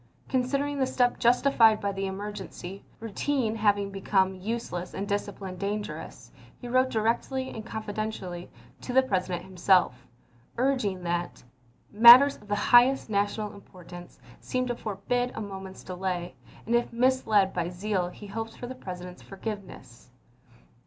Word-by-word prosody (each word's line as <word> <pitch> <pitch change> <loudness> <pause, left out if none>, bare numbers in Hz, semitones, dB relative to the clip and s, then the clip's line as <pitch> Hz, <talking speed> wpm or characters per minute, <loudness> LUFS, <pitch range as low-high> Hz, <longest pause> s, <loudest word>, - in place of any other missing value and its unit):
Considering 275 +3 0
the 265 - +3
step 245 -1 +1
justified 235 -3 +4
by 200 - -1
the 195 0 -3
emergency, 195 -1 -7 0.2
routine 230 +2 -1
having 205 -2 +1
become 190 -1 +1
useless 185 -2 -5
and 200 - -3
discipline 200 -2 -4
dangerous, 205 +2 -5 0.3
he 245 - -8
wrote 255 +1 +2
directly 240 +4 -1
and 220 0 -8
con 220 -1 -5
fidentially 205 -5 -5 0.3
to 250 - -5
the 265 +1 +5
President 185 -6 -2
himself, 180 -9 +2 0.5
urging 235 -8 0
that 175 0 -3 0.3
" 120 - -35
matters 240 +6 +9
of 210 - -18
the 205 - 0
highest 240 +3 +4
national 205 +1 -1
importance 175 -3 -13 0.2
seem 255 0 -2
to 240 -1 -2
forbid 240 +4 -2
a - - -4
moment's 190 -2 -8
delay, 180 -1 -4 0.3
and 230 - -2
if 240 0 +1
misled 235 -5 +2
by 175 -1 -2
zeal 180 0 -2
he 205 - -12
hopes 225 +2 -6
for - - -8
the 250 - -6
President's 180 -5 -8
forgiveness. 195 - -8
205 Hz, 145 wpm, -27 LUFS, 190-240 Hz, 0.5 s, matters